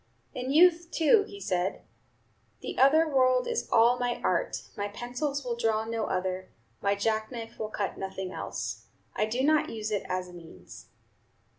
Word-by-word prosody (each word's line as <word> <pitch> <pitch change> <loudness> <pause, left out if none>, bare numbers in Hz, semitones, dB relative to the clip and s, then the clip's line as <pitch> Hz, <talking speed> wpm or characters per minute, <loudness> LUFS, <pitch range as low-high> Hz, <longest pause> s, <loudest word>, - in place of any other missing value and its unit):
In 255 +1 -3
youth, 340 +2 +5
too, 370 +6 +4
he 400 - -10
said, 185 - -1 0.8
"The - - -5
other 310 +5 +6
world 255 -3 +3
is - - -2
all 235 +2 +5
my 245 -1 -1
art, 180 -2 0
my 205 - -2
pencils 250 +6 -4
will 240 -1 -1
draw 220 -2 0
no 225 0 -2
other, 185 0 -2 0.3
my 200 0 +2
jack 220 +2 -1
knife 230 -1 -8
will 215 - -3
cut 205 -2 -3
nothing 190 -1 -5
else; - - -5 0.3
I 215 - +1
do 245 +4 -1
not 305 +1 +3
use 215 -1 -4
it 205 - 0
as 185 0 -2
a 180 - -13
means." 170 -2 -13
230 Hz, 170 wpm, -28 LUFS, 200-265 Hz, 0.8 s, other